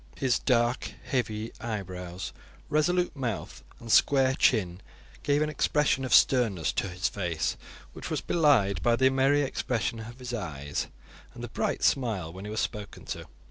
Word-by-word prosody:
His 130 -3 +1
dark, 120 -1 +1
heavy 110 -3 -2
eyebrows, 90 -5 -5 0.4
resolute 175 +3 +1
mouth, 125 -7 -4 0.2
and 115 -1 -6
square 135 +2 +5
chin 95 -9 +2 0.4
gave 145 +1 +2
an 155 - -1
expression 150 -2 +1
of 130 - -4
sternness 110 - +4
to 95 - -1
his 90 +1 -1
face, 85 -5 -2 0.4
which - - -7
was - - -1
belied 115 - +3
by 120 -1 +3
the 130 +2 +4
merry 135 +2 +3
expression 115 -4 -2
of 115 +2 -9
his 125 -1 -7
eyes 75 - -3 0.5
and - - -8
the - - -5
bright - - -2
smile 105 -11 +1
when 95 +2 -8
he - - -5
was 110 +1 -1
spoken 105 -1 -5
to. - - -10
115 Hz, 160 wpm, -28 LUFS, 95-135 Hz, 0.5 s, square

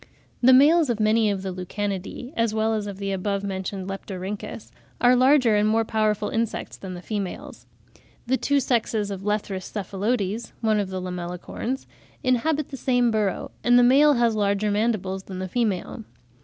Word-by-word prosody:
The 255 +1 +6
males 295 +4 +6
of 230 -2 0
many 215 0 +3
of 195 -2 -2
the 190 - -3
Lucanidae, 195 - -5
as 230 -1 0
well 220 0 +1
as 210 -2 -2
of 200 -2 -6
the 200 0 -3
above 200 +1 -2
mentioned 190 -1 -4
Leptorhynchus, 195 +2 -6 0.3
are 245 +1 +5
larger 255 -3 +4
and 210 +1 +3
more 225 +1 +2
powerful 215 -1 0
insects 225 -1 -2
than 185 -2 -8
the 175 - -9
females. 200 -4 -5 0.6
The 255 +2 +2
two 285 +2 +1
sexes 220 -5 0
of 195 -1 -5
Lethrus 200 -2 -3
cephalotes 205 +2 -2
(one 215 -2 +2
of 200 -2 -2
the 190 0 -4
Lamellicorns) 180 +8 -5 0.4
inhabit 280 +4 +1
the 270 - -7
same 245 -2 +2
burrow; 210 -4 -1
and 245 0 +5
the 245 - +6
male 285 +4 +6
has 235 -2 +2
larger 205 0 +1
mandibles 205 -3 -1
than 190 - -7
the 185 0 -4
female. 220 0 -2
215 Hz, 170 wpm, -24 LUFS, 195-240 Hz, 0.6 s, The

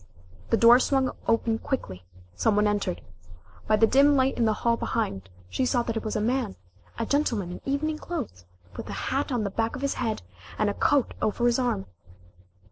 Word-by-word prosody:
The - - +3
door 235 +2 +7
swung 265 -1 +1 0.2
open 225 0 +1
quickly 95 - -4 0.3
some 215 - +1
one 210 0 +3
entered. 205 - -1 0.7
By 215 - +4
the 220 +1 +5
dim 280 +5 +5
light 265 0 +2
in 235 - +1
the 220 - +3
hall 235 0 +4
behind, 100 - -3 0.2
she 260 - -2
saw 250 -1 +1
that 230 -1 -3
it 225 - -2
was 215 - -3
a - - +1
man 235 - -1 0.4
a 230 - -1
gentleman 230 -10 0
in - - -8
evening 305 +3 -1
clothes, 245 - -6 0.3
with - - -7
a - - -4 0.2
hat 275 +1 -1
on 240 -4 0
the 200 - -2
back 225 +2 -1
of 260 - -6
his 280 - +1
head, 225 - -2 0.3
and 210 - +1
a - - -5
coat 275 +4 +2
over 225 +3 0
his 240 +1 +3
arm. 245 - -1
230 Hz, 205 wpm, -26 LUFS, 210-265 Hz, 0.7 s, door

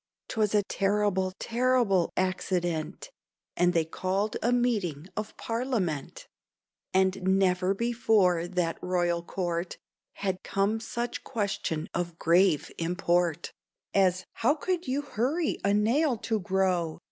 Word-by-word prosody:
'Twas 215 -2 +1
a 205 - +4
terrible, 195 -1 +1
terrible 235 -6 +2
accident, 180 - -1 0.4
And 175 0 +3
they 165 -3 +1
called 190 +5 -1
a 240 - +2
meeting 205 - 0
of 215 0 -5
parliament; 225 - -2 0.6
And 190 +1 +2
never 190 0 +2
before 210 -7 +2
that 175 -2 -1
royal 175 -1 0
Court 175 0 -3 0.4
Had 190 -2 -3
come 200 +3 0
such 235 +1 -4
question 195 -8 -2
of 170 -1 -3
grave 175 -2 +3
import 175 -1 0 0.4
As 185 -2 +2
"How 265 +7 +2
could 355 +1 -2
you 275 +3 -1
hurry 285 +5 -1
a 200 - +3
nail 235 +7 +2
to 220 0 -1
grow?" 180 -3 0
190 Hz, 120 wpm, -28 LUFS, 175-225 Hz, 0.6 s, a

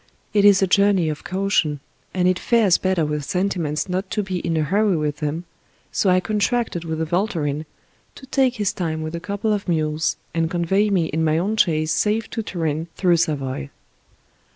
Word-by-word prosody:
It 205 -1 +4
is 200 -1 +6
a - - +5
journey 195 -3 +3
of 155 0 -5
caution, 185 -6 0 0.3
and 180 -1 +1
it 185 0 +2
fares 220 -7 +3
better 185 -4 +1
with 150 0 -2
sentiments 175 -3 -1
not 190 +1 -2
to 210 - -1
be 185 -2 -3
in 165 -2 -1
a 155 - +2
hurry 195 +3 +2
with 150 -1 -2
them, 155 +2 -3 0.5
so 195 - +1
I 185 0 +5
con 210 +3 -2
tracted 215 -4 0
with 160 -1 -3
a - - +1
volturin 160 -4 -1 0.5
to 265 - -12
take 265 -2 +1
his 205 -4 0
time 160 -3 -3
with 155 +1 -5
a 170 - -3
couple 205 +4 -1
of 205 -1 -3
mules 155 -1 0 0.2
and 165 -1 0
convey 190 +4 +1
me 185 -5 +2
in 160 +1 -1
my 155 0 +2
own 200 +6 0
chaise 155 -6 +2
safe 215 +1 +1
to 225 - -2
Turin 165 -5 -2
through 175 -3 +3
Savoy. 135 - -2
180 Hz, 200 wpm, -22 LUFS, 155-200 Hz, 0.5 s, is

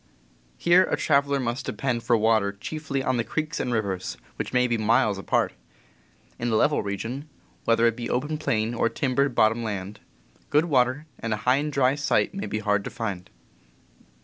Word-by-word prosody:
Here 180 +2 +5
a - - +1
traveler 140 -1 +2
must 120 0 -2
depend 125 -3 -1
for 115 0 +2
water 110 -2 +2
chiefly 140 +5 -4
on 130 -1 +1
the 120 - +1
creeks 155 +5 -3
and 125 - -1
rivers, 100 -5 -2 0.2
which - - -4
may 125 0 +3
be 120 -1 +1
miles 110 -2 +2
apart. - - 0 0.9
In 120 - -1
a 110 - +1
level 150 +7 +3
region, 115 +9 -5 0.4
whether 115 0 +3
it 115 -1 +3
be 120 0 -5
open 150 +5 -1
plain 110 -5 0
or 115 0 +1
timbered 135 0 0
bot 110 -1 +5
tom 115 +1 -4
land, 100 -2 -4 0.5
good 150 +3 +3
water 130 -1 +1
and 115 -1 -1
a 105 - -10
high 125 +1 +4
and 150 +1 -2
dry 135 -2 +3
site 150 +6 +1
may 195 +1 -4
be - - -2
hard 105 -2 +1
to - - -3
find. 100 -7 -5
120 Hz, 190 wpm, -25 LUFS, 110-140 Hz, 0.9 s, Here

